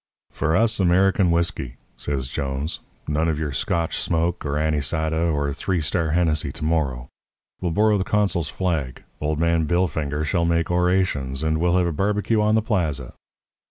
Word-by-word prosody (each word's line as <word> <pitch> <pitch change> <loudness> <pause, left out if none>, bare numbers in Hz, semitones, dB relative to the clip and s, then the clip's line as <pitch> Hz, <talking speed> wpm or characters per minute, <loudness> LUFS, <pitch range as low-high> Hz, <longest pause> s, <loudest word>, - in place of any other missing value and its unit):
"'For 80 +1 0
us 110 +3 +2
American 95 +1 +3
whisky,' 85 -7 0 0.2
says 70 -3 -3
Jones 70 +2 -3 0.3
'none 75 +2 +1
of 80 - 0
your 75 -2 -2
Scotch 80 +5 -1
smoke 85 +1 0
or 70 -1 -2
anisada 80 +2 0
or 70 -2 -1
Three 90 +5 -1
Star 80 +1 0
Hennessey 80 -4 +1
to 75 - -5
morrow. 70 -7 0 0.5
We'll 90 - 0
borrow 105 +4 +3
the - - +1
consul's 95 -7 0
flag; 80 -7 -2 0.2
old 75 0 0
man 85 -1 +2
Billfinger 75 -4 0
shall 85 +2 +1
make 85 0 +1
orations, 90 -7 +1
and 80 0 +1
we'll 90 +1 +2
have 90 - +3
a 85 - 0
barbecue 105 +6 +1
on 105 +1 +3
the 110 - +2
plaza.' 80 - -1
80 Hz, 165 wpm, -23 LUFS, 75-90 Hz, 0.5 s, American